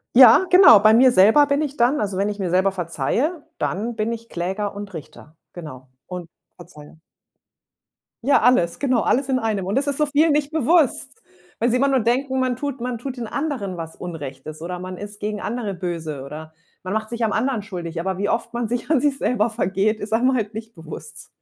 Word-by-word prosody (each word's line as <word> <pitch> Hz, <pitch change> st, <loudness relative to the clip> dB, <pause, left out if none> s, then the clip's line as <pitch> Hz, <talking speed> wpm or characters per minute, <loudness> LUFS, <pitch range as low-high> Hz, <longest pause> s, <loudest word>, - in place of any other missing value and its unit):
Ja, 255 Hz, +7 st, +8 dB
genau, 360 Hz, -, +9 dB
bei 215 Hz, +1 st, +6 dB
mir 255 Hz, +2 st, +6 dB
selber 220 Hz, +10 st, +6 dB
bin 280 Hz, +1 st, +1 dB
ich 290 Hz, -1 st, -4 dB
dann, 245 Hz, +2 st, +2 dB
also, 195 Hz, -2 st, -2 dB
wenn 200 Hz, +1 st, +1 dB
ich 210 Hz, 0 st, -4 dB
mir 185 Hz, -3 st, -2 dB
selber 190 Hz, +2 st, +2 dB
verzeihe, 190 Hz, -, -2 dB
dann 225 Hz, +5 st, -2 dB
bin 215 Hz, +1 st, -1 dB
ich 230 Hz, 0 st, -6 dB
Kläger 190 Hz, +4 st, -3 dB
und 205 Hz, -1 st, -8 dB
Richter, 155 Hz, 0 st, -11 dB, 0.2 s
genau, 140 Hz, -7 st, -10 dB, 0.2 s
und 180 Hz, -2 st, -7 dB, 0.3 s
verzeihe. 160 Hz, -2 st, -15 dB, 1.2 s
Ja, 280 Hz, +2 st, +4 dB
alles, 215 Hz, -8 st, +3 dB
genau, 255 Hz, -5 st, +1 dB
alles 270 Hz, +1 st, 0 dB
in 255 Hz, -1 st, +1 dB
einem. 210 Hz, -5 st, -2 dB
Und 195 Hz, -, -2 dB
das 280 Hz, +2 st, +2 dB
ist 280 Hz, -, 0 dB
so 300 Hz, -, +2 dB
vielen 300 Hz, +2 st, +3 dB
nicht 290 Hz, 0 st, 0 dB
bewusst. 300 Hz, -3 st, +1 dB, 0.3 s
Weil 235 Hz, +2 st, +1 dB
sie 250 Hz, -, +2 dB
immer 275 Hz, +2 st, +2 dB
nur 270 Hz, -2 st, +2 dB
denken, 260 Hz, +3 st, 0 dB
man 255 Hz, -1 st, 0 dB
tut 275 Hz, -1 st, -5 dB
man 245 Hz, 0 st, -3 dB
tut 260 Hz, 0 st, -6 dB
den 235 Hz, -, -4 dB
anderen 255 Hz, -, -3 dB
was 160 Hz, -1 st, -7 dB
Unrechtes 155 Hz, -3 st, -8 dB
oder 180 Hz, +1 st, -5 dB
man 185 Hz, 0 st, -7 dB
ist 205 Hz, 0 st, -9 dB
gegen 210 Hz, 0 st, -4 dB
andere 215 Hz, -3 st, -3 dB
böse 165 Hz, -6 st, -5 dB
oder 155 Hz, +3 st, -9 dB, 0.3 s
man 185 Hz, +2 st, -4 dB
macht 220 Hz, 0 st, -2 dB
sich 235 Hz, -1 st, -3 dB
am 215 Hz, -, +1 dB
anderen 240 Hz, 0 st, 0 dB
schuldig, 175 Hz, -5 st, -6 dB
aber 190 Hz, +1 st, -2 dB
wie 200 Hz, +1 st, -1 dB
oft 235 Hz, +1 st, -2 dB
man 235 Hz, -1 st, -2 dB
sich 240 Hz, +4 st, -4 dB
an 310 Hz, -5 st, +3 dB
sich 285 Hz, -2 st, +1 dB
selber 235 Hz, -4 st, 0 dB
vergeht, 205 Hz, +2 st, 0 dB
ist 210 Hz, +1 st, -5 dB
einem 255 Hz, +3 st, +3 dB
halt 215 Hz, -2 st, -2 dB
nicht 225 Hz, 0 st, -8 dB
bewusst. 155 Hz, -1 st, -9 dB
215 Hz, 215 wpm, -22 LUFS, 180-255 Hz, 1.2 s, genau